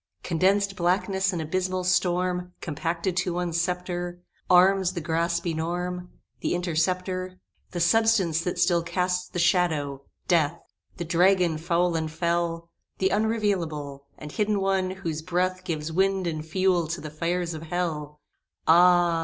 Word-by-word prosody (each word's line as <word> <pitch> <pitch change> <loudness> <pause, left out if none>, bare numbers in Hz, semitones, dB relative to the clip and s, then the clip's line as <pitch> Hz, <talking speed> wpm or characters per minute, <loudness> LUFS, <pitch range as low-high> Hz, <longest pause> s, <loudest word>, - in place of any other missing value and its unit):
Condensed 195 +3 +1
blackness 190 +2 +1
and 170 -3 -3
abysmal 185 +3 -1
storm 180 0 0
Compacted 170 +3 -2
to 175 -1 0
one 175 -1 -2
sceptre 175 0 -2 0.3
Arms 185 +1 +5
the 175 - -3
Grasp 170 +1 -1
enorm 175 +2 -3 0.3
The - - -1
Interceptor 185 +2 -1 0.3
The 175 - -5
Substance 190 -3 +3
that 180 0 -2
still 175 0 +3
casts 180 +1 -1
the - - -6
shadow 160 -6 +1 0.3
Death! 165 -2 +2 0.4
The 175 - -4
Dragon 175 -1 +3
foul 170 +1 +1
and 160 -1 -1
fell 170 0 -1 0.3
The 190 - +2
unrevealable, 190 -11 -1 0.2
And 150 - -9
hidden 210 +2 0
one, 195 -1 +1
whose 170 -5 -4
breath 185 +2 -1
Gives 160 -3 -3
wind 190 +2 +1
and 155 -2 -3
fuel 180 +1 +1
to 170 +2 -3
the 155 - -7
fires 170 +2 -2
of 155 - -6
Hell! 155 -3 -3 0.5
Ah! 175 0 +5
175 Hz, 140 wpm, -26 LUFS, 165-185 Hz, 0.5 s, Arms